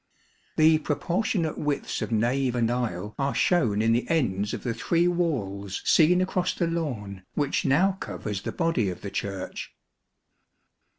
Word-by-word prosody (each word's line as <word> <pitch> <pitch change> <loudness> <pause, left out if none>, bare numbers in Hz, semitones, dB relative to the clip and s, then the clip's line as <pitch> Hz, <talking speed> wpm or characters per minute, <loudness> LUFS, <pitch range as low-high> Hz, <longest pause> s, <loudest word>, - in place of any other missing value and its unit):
The 155 0 +5
proportionate 170 +2 -1
widths 145 -1 -2
of - - -3
nave 125 +3 +1
and 120 -1 +1
aisle 105 -5 -2
are 140 0 0
shown 110 - +2
in 115 - +3
the 120 - 0
ends 105 - +1
of - - -5
the 120 - -1
three 170 +9 +1
walls 105 - -1
seen 180 +3 +5
across 185 -1 0
the 170 - 0
lawn, 125 - -3
which 145 -2 0
now 175 +9 +4
covers 105 -2 -5
the - - -4
body 165 - 0
of 90 - -6
the 100 - -6
Church. 95 -2 -5
135 Hz, 155 wpm, -26 LUFS, 105-165 Hz, -, The